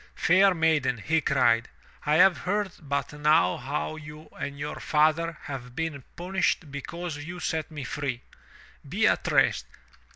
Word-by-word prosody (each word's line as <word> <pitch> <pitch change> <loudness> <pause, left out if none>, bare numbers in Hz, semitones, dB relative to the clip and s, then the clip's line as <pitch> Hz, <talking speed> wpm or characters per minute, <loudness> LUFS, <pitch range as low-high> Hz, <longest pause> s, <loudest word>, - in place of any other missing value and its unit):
"Fair 190 +2 +4
maiden," 160 -6 +2
he 160 +9 +1
cried, 120 -5 +2 0.4
"I 150 - +4
have 180 +2 +6
heard 200 +1 -1
but 140 -1 -3
now 150 - +3
how 145 +4 -3
you 155 0 -11
and 140 0 -4
your 145 +1 -5
father 155 +2 +2
have 125 -3 -7
been 155 -4 -3
punished 180 -4 -1
because 160 +3 -5
you 170 +4 -7
set 160 -3 -2
me 150 -3 -7
free. 130 -2 -4 0.7
Be - - +1
at - - +1
rest. - - +3
150 Hz, 150 wpm, -27 LUFS, 140-165 Hz, 0.7 s, have